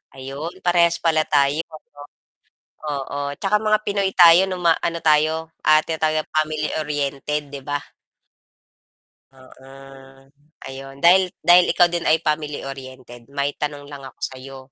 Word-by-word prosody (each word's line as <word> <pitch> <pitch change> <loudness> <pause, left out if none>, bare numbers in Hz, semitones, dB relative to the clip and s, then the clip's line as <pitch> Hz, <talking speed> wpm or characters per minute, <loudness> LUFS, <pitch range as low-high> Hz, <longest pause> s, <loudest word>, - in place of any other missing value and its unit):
Ayon 135 +5 -7
parehas 170 -1 +3
pala 160 -2 +2
tayo. 145 +1 +2 1.2
Oo, 140 -1 -4
tsaka 205 +1 +1
mga 215 0 +2
pinoy 200 -1 0
tayo 175 +1 +7
nung 185 -1 -5
ma 165 -1 +4
ano 170 0 -2
tayo 155 +1 +2 0.2
ah 155 0 +6
tinatawag 155 -1 -1
tayo - - -63
family-oriented 150 -2 -2
'di 140 -1 -8
ba? 145 0 -3 1.5
Oo. 130 0 -18 1.0
Ayon 135 +1 -10
dahil 180 +3 +5
dahil 175 0 +5
ikaw 175 - +5
din 170 0 -3
ay 160 - +3
family-oriented 135 -5 -6
may 140 0 -2
tanong 145 -1 -5
lang 140 -1 -10
ako 130 - -12
sayo, 135 +1 -7
150 Hz, 130 wpm, -21 LUFS, 140-170 Hz, 1.5 s, tayo